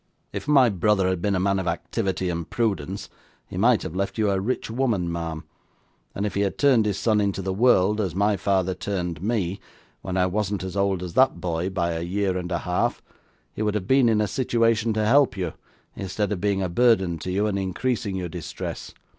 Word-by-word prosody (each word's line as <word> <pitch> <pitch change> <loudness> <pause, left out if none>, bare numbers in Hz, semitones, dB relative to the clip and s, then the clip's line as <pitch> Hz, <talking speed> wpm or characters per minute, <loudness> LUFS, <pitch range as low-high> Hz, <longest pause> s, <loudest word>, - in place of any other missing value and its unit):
If - - -5
my 140 -4 +6
brother 95 -1 +2
had 95 -2 -1
been 100 +1 +1
a - - +1
man 100 +1 +1
of 95 - -3
activity 95 -2 -2
and 85 -1 -4
prudence, 100 -4 -2 0.4
he - - -11
might 110 +1 +3
have 80 - -6
left 100 +4 -2
you 105 -2 +2
a 95 - +1
rich 125 +6 -2
woman, 115 -9 0
ma'am: 80 -2 -4 0.7
and 100 - -1
if 105 - -2
he 100 - 0
had 100 -1 -1
turned 130 -7 +4
his 100 -2 -1
son 110 -2 +2
into 100 -1 -1
the 95 0 -2
world, 105 -1 +3
as 90 -5 -2
my 100 +2 +2
father 95 -1 +1
turned 90 -3 -3
me, 100 -3 -1 0.4
when 95 0 -3
I 90 - +3
wasn't 100 0 -1
as 95 -1 -5
old 100 -2 0
as 90 -2 -6
that 130 -7 +3
boy 85 +1 -2
by 85 -3 -1
a 80 0 -3
year 95 +2 -1
and 90 0 -4
a 85 - +1
half, 90 +1 -1 0.5
he - - -6
would 105 -1 0
have 100 -3 -2
been 130 +1 +4
in 110 -1 +3
a 105 - +1
situation 115 -2 +1
to 110 0 0
help 125 -3 +4
you, 90 -4 -2 0.4
instead 100 +2 -2
of 95 -4 -2
being 100 -1 +1
a - - 0
burden 95 -4 +3
upon 90 - -3
you, 100 +3 +1
and 100 -2 0
increasing 100 +2 -2
your 90 -2 -3
distress. 85 -1 -6
100 Hz, 220 wpm, -24 LUFS, 90-105 Hz, 0.7 s, my